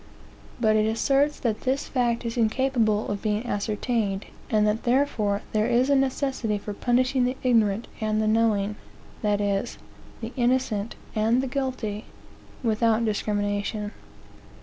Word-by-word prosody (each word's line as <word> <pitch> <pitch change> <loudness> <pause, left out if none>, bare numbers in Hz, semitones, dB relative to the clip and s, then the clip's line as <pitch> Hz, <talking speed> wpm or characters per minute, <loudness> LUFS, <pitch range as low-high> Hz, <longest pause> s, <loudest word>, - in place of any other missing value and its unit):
But 215 -2 +3
it 215 0 +3
asserts 275 +6 +2
that 220 -3 -1
this 270 +2 -1
fact 240 -2 0
is 230 - -3
incapable 230 -2 +1
of 205 -1 -3
being 215 +2 -1
ascertained, 210 -1 -1 0.2
and 215 -1 +3
that 210 +1 +1
therefore 240 -6 +1
there 215 +1 +1
is 250 +3 +3
a - - +5
necessity 265 -5 0
for 205 +1 -6
punishing 255 +4 +2
the 255 +1 -1
ignorant 225 -3 +2
and 215 -1 0
the 215 - +1
knowing 215 -2 +2 0.4
that 210 -1 +1
is, 200 +2 -1 0.4
the 230 +2 -6
innocent 240 -4 0 0.2
and 225 +4 +2
the - - -2
guilty 250 -6 -3 0.6
without 230 0 +2
discrimination. 205 0 -1
225 Hz, 140 wpm, -25 LUFS, 210-250 Hz, 0.6 s, a